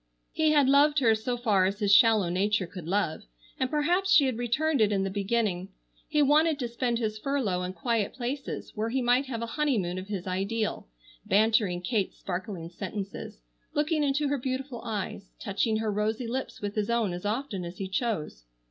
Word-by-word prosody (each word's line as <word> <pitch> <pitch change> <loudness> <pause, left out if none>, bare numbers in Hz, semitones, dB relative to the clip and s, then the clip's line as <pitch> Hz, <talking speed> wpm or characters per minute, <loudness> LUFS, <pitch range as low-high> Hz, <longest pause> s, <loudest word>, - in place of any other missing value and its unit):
He 315 -1 +2
had 290 -3 +4
loved 290 +2 +5
her 235 -6 +5
so 230 +3 -2
far 205 -6 +3
as 200 +1 -2
his 205 -1 +2
shallow 220 -3 +6
nature 195 +2 +1
could 170 -2 -9
love, 190 -3 0 0.4
and 260 - +1
perhaps 350 +6 +1
she 300 -5 +7
had 255 -3 -1
returned 270 +4 +1
it 210 -1 +4
in 195 -1 +1
the 195 - -2
beginning. 195 -2 -1 0.4
He 300 -1 +3
wanted 305 +2 +4
to 250 -4 -2
spend 235 0 -1
his 215 -2 -2
furlough 235 -9 -1
in 180 0 -4
quiet 230 -2 -1
places 265 +3 -4
where 220 +1 -2
he 260 +3 0
might 250 +3 +3
have 230 -3 -4
a 230 - -6
honeymoon 195 -12 +1
of 185 - -8
his 200 -4 -4
ideal, 200 - -2 0.4
bantering 210 -4 +2
Kate's 205 -1 -1
sparkling 180 -2 -5
sentences, 195 - -6 0.3
looking 300 +1 +1
into 285 +1 +1
her 285 0 0
beautiful 260 0 -4
eyes, 200 -3 -5
touching 215 +2 0
her 220 -1 -1
rosy 215 +4 -1
lips 255 +3 -4
with 205 -1 -3
his 210 0 -1
own 230 -6 +1
as 175 - -6
often 215 -2 -2
as 175 +1 -7
he 195 - -4
chose. 185 - -3
220 Hz, 190 wpm, -28 LUFS, 195-265 Hz, 0.4 s, she